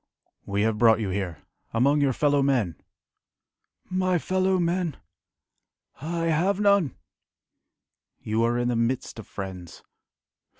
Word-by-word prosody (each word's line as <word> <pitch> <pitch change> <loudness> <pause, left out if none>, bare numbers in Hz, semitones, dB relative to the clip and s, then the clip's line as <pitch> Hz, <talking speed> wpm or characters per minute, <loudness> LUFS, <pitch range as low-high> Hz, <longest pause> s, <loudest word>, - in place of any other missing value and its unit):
"We 100 +1 0
have 110 -1 0
brought 115 -2 +5
you 105 -3 -2
here, 90 -5 -4 0.3
among 140 +5 +3
your 140 -2 +3
fellow 145 +2 +2
men." 125 - +1 1.1
"My 185 -1 +1
fellow 185 +2 +1
men!... 170 -3 -1 1.0
I 165 +2 -2
have 175 +5 +1
none!" 200 - +3 1.2
"You 110 +1 -1
are 120 +1 +1
in 120 0 0
the 120 - 0
midst 115 0 -1
of 110 - -10
friends." 95 -3 -8
135 Hz, 125 wpm, -26 LUFS, 110-170 Hz, 1.2 s, brought